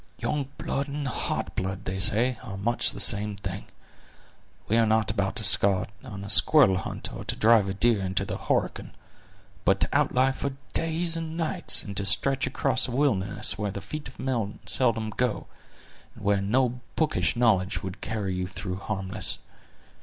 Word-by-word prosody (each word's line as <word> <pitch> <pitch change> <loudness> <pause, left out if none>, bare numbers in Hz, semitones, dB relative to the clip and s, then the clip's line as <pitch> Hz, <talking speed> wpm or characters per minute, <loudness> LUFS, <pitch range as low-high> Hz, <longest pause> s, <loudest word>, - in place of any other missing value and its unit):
"Young 145 -3 -2
blood 140 +1 -2
and 145 0 -4
hot 130 - -3
blood, 95 0 -3
they 95 +1 -3
say, 115 +5 +2
are 95 -3 -7
much 115 +4 +1
the - - -8
same 105 -1 +2
thing. 95 0 -6 1.0
We 110 - +2
are 115 -1 +4
not 110 -1 +2
about 95 -1 -1
to - - -1
start 100 -2 +2
on 100 -1 -8
a 100 - -7
squirrel 125 -4 +5
hunt, 95 - -3
or - - -7
to - - -2
drive 110 -3 +4
a - - -2
deer 115 0 +3
into 95 -1 -1
the - - -4
Horican, - - -2 0.7
but - - +3
to - - +4
outlie 130 +1 +3
for 140 0 -4 0.2
days 165 +1 +2
and 165 0 -5
nights, 165 -2 +2
and 100 - -7
to 100 - +1
stretch 135 +7 +5
across 130 -2 0
a - - -5
wilderness 105 -7 0
where 105 -1 -1
the 100 - -5
feet 150 +9 -7
of - - -14
men 115 -6 -2
seldom 115 -4 0
go, 125 -1 -1 0.7
and - - -13
where 100 -1 +2
no 125 +4 0
bookish 155 -4 0
knowledge 105 -5 +1
would 95 0 -7
carry 105 -4 -3
you 90 0 -2
through 95 0 -5
harmless. 95 -1 -3
110 Hz, 180 wpm, -26 LUFS, 95-130 Hz, 1.0 s, squirrel